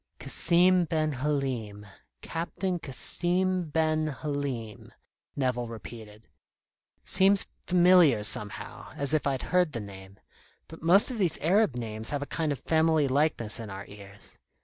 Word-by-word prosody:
"Cassim 180 +1 +3
ben 155 -1 -1
Halim 130 -7 -3 0.4
Captain 175 +2 -3
Cassim 175 +5 -1
ben 155 0 0
Halim," 140 -7 -5 0.4
Nevill 125 -3 -1
repeated. 110 0 -11 0.8
"Seems 195 +1 +3 0.2
familiar 175 - +5
somehow, 105 -2 -3
as 140 +1 0
if 155 -2 +1
I'd 135 -2 -2
heard 180 -4 +3
the 115 - -3
name; 100 -2 -11 0.5
but 160 - -12
most 185 - +4
of 240 - -5
these 180 -5 +1
Arab 185 - +2
names 110 -2 -4
have 145 -1 -2
a - - -7
kind 160 -2 -1
of 140 - -3
family 160 -2 +2
likeness 135 -6 0
in 115 -2 -7
our 95 0 -8
ears. 100 -1 -11
145 Hz, 135 wpm, -27 LUFS, 115-170 Hz, 0.8 s, familiar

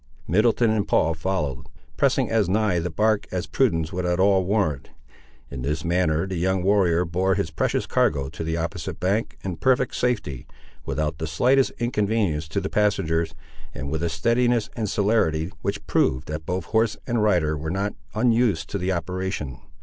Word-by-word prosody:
Middleton 110 +4 +3
and 110 -2 0
Paul 80 +1 +2
followed, 80 -6 -2 0.3
pressing - - +2
as 110 -5 +2
nigh 100 -3 +2
the 85 +2 -2
bark 110 +4 +1
as 90 -1 -2
prudence 80 -12 0
would 90 0 -2
at 90 0 0
all 95 0 +4
warrant. 90 -9 0 0.6
In 70 -2 -5
this 75 +4 -2
manner 85 -1 +1
the 95 -2 -4
young 95 +1 0
warrior 90 -3 +3
bore 90 +3 +1
his 100 -5 -2
precious - - 0
cargo 70 -2 +1
to 75 - -6
the 80 +1 -2
opposite 85 0 -4
bank 100 +5 -1
in 90 -3 -4
perfect 130 +5 +2
safety, 105 - -1 0.4
without 75 +1 -2
the 80 - -3
slightest 125 - +3
inconvenience 105 -9 0
to 80 +5 -1
the 95 - -3
passengers, 95 -7 0 0.4
and 70 +2 -5
with 80 +1 -2
a 85 - 0
steadiness 115 +5 +1
and 110 -4 -2
celerity 95 -6 +1
which 100 0 -3
proved 65 - +1
that 75 0 -5
both 90 -1 -2
horse 110 0 +1
and 120 -3 0
rider 90 -8 +2
were 75 +2 -4
not 100 +4 -1 0.2
unused 115 -8 +2
to - - -2
the 90 +2 -1
operation. 90 -6 -3
90 Hz, 175 wpm, -24 LUFS, 80-105 Hz, 0.6 s, all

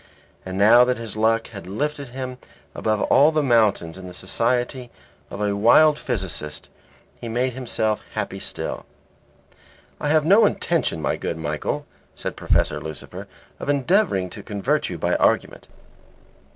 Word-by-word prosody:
And 95 0 -4
now 110 +5 +7
that 125 0 0
his 115 -3 -5
luck 110 +1 +1
had 95 -4 -10
lifted 145 +8 -3
him 130 0 -6 0.3
above 110 -1 -1
all 145 +3 +5
the 155 -1 +1
mountains 105 -9 +2
in 95 - -9
the 90 - -9
society 120 +6 -1 0.4
of - - -7
a 100 -1 0
wild 150 +9 +5
physicist, 95 - -4 0.5
he 115 - -6
made 125 +2 0
himself 110 -4 -1
happy - - -3
still. - - -5 1.1
"I 145 - -2
have 155 0 +3
no 205 +5 +6
intention, 165 - -1
my - - 0
good 85 - -4
Michael," 75 -2 -3 0.3
said - - -5
Professor - - 0
Lucifer, 80 -2 -8 0.3
"of - - -5
endeavouring 140 - +1
to - - -8
convert 120 +9 -1
you 90 - -5
by - - 0
argument. - - +1
115 Hz, 150 wpm, -23 LUFS, 95-140 Hz, 1.1 s, now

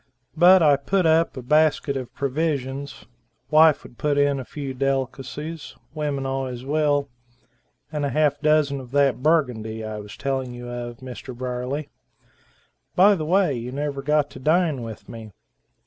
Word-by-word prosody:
But 175 +2 +7
I 145 -2 +5
put 185 +6 0
up 160 -2 +3
a 130 - -6
basket 150 +1 +2
of 130 -2 -5
provisions, 140 -1 -3 0.5
wife 155 0 +6
would 120 - -15
put 145 -1 +1
in 145 -1 +2
a - - -4
few 140 +1 -6
delicacies, 135 +4 -3 0.2
women 145 -3 -2
always 130 -2 -3
will, 145 -1 +1 0.8
and 150 -2 -2
a 140 - 0
half 150 +2 +1
dozen 150 -2 +2
of 130 -2 -10
that 140 -3 +2
Burgundy, 125 -8 0
I 110 -1 -5
was 105 0 -10
telling 130 -2 -2
you 120 0 -8
of 120 -1 -6
Mr. 130 -1 -8
Briefly. 130 +3 -4 1.0
By 200 +3 +6
the 160 -6 -2
way, 180 -2 +3
you 120 +1 -5
never 140 0 -3
got 150 0 +1
to 130 - -10
dine 155 -1 +2
with 110 -2 -8
me." 115 -2 -9
140 Hz, 160 wpm, -23 LUFS, 125-155 Hz, 1.0 s, But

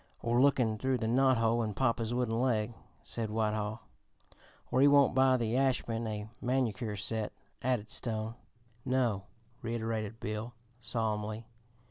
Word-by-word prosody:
"Or 120 +1 +3
'Lookin' 125 -6 +3
Through 130 +2 +1
the 110 -2 -2
Knot 130 +2 +4
Hole 115 +1 +2
in 105 -3 -2
Papa's 115 -2 +1
Wooden 120 -1 0
Leg,'" 120 -3 +1 0.3
said 115 -2 -4
Whitehall. 110 0 -1 0.9
"Or 130 - +3
'He 140 - +8
Won't 140 -1 +6
Buy 130 0 +5
the 115 -1 -1
Ashman 120 -4 +1
a 105 -1 -4
Manicure 120 -4 0
Set,'" 105 +2 -1 0.3
added 125 -4 0
Stone. 110 -1 -3 0.5
"No," 120 -7 +1 0.4
reiterated 115 -2 -3
Bill 110 +3 -4 0.2
solemnly. 110 -1 -2
115 Hz, 135 wpm, -32 LUFS, 110-125 Hz, 0.9 s, He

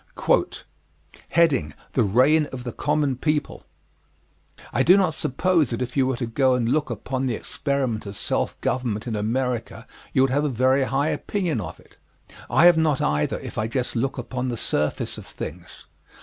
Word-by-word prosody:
THE 165 - -1 0.3
REIGN 135 +9 +4
OF 130 -3 -7
THE 120 - -4
COMMON 145 -2 0
PEOPLE 150 +2 -1 1.1
I - - +2
do 180 +4 +6
not 185 -5 +2
suppose 165 +3 +1
that 120 +1 -3
if 125 - -7
you 135 -2 +3
were 130 -2 -1
to 120 - -2
go 130 +3 +2
and 120 -2 0
look 145 +3 +1
upon 130 +3 -3
the 120 - 0
experiment 130 -7 -2
of 100 -1 -7
self - - -2
government 120 -4 -1
in 115 -3 -3
America 120 +3 -2 0.3
you 130 - +3
would 135 - +2
have 145 +3 +1
a 150 - +1
very 130 +2 +2
high 135 +4 0
opinion 175 - -1
of 85 -3 -8
it. - - -22 0.5
I 170 - +5
have 175 -2 +7
not 155 -4 +2
either, 75 +1 0
if - - -6
I 110 - 0
just 125 +2 -3
look 135 +4 -1
upon 125 +1 -3
the 120 -2 -2
surface 75 -7 -2
of - - -12
things. - - -9
130 Hz, 180 wpm, -24 LUFS, 120-145 Hz, 1.1 s, have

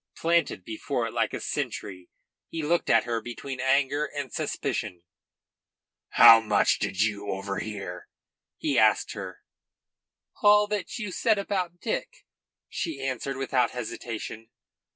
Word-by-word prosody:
Planted 165 - +1
before 110 - -2
it - - -5
like - - 0
a - - -4
sentry, 90 -2 -4 0.4
he 165 -1 -4
looked 170 +3 +1
at - - +5
her 115 -1 -2
between 130 +3 -7
anger 135 +2 +2
and 145 -5 -6
suspicion. 85 -1 -3 1.1
"How 115 - +10
much 105 -2 +2
did 95 +2 0
you 105 -1 -2
overhear?" 100 +1 -5 0.5
he - - +1
asked - - +3
her. - - -8 1.0
"All 210 0 +6
that 210 -2 -3
you 210 -5 -4
said 220 +3 +2
about 185 -3 -2
Dick," - - -4 0.4
she 160 -5 -4
answered 135 0 -3
without 135 -1 +1
hesitation. 115 -1 -6
135 Hz, 130 wpm, -27 LUFS, 110-170 Hz, 1.1 s, How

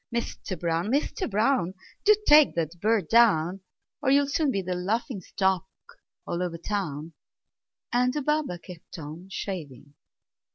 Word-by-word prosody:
Mister 235 -5 -4
Brown! 170 +3 -1
Mister 290 - 0
Brown! 215 -3 +1 0.3
Do 425 +1 +7
take 300 0 +7
that 165 +1 -2
bird 215 -5 +2
down, 195 -6 +4 0.4
Or 280 - +1
you'll 280 +1 +5
soon 285 +1 +1
be 195 -7 -1
the 180 0 -2
laughing 200 +4 -2
stock 190 +1 0 0.6
all 175 - -3
over 175 -2 -2
town!" 165 -4 -4 0.8
And 250 +1 +3
the 295 +1 -3
barber 300 -10 0
kept 175 0 -12
on 160 +4 -8
shaving. 145 - -6
195 Hz, 140 wpm, -27 LUFS, 170-250 Hz, 0.8 s, Do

